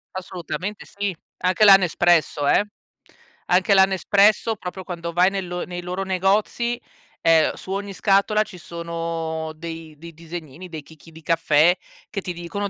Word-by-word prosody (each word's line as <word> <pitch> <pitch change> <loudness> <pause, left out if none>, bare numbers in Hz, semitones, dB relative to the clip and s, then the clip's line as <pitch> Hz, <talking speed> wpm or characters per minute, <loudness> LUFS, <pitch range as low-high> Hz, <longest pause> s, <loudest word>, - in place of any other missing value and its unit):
Assolutamente 185 +2 -5
sì. 200 -3 -4 0.2
Anche 185 +4 +1
la 195 -1 +10
Nespresso, 175 -5 +2
eh? - - +4 0.8
Anche 185 +2 +3
la 190 -1 +7
Nespresso, 205 +3 +3
proprio, 185 -1 -7
quando 170 -2 -5
vai 180 +3 +4
nel 195 -2 -3
lo 175 0 -4
nei 175 0 -6
loro 180 +2 -4
negozi, 205 +6 0 0.4
ehm, 160 -1 +4
su 190 - -9
ogni 200 0 -3
scatola 205 +2 +2
ci 190 -4 -12
sono 165 -1 -4
dei 165 -1 -8
dei 165 +1 -11
disegnini, 165 +1 -9
dei 155 -3 -7
chicchi 160 +1 -17
di 160 +1 -14
caffè 165 0 +3 0.3
che 200 -2 -4
ti 180 - -5
dicono 175 +4 -4
180 Hz, 155 wpm, -22 LUFS, 165-195 Hz, 0.8 s, la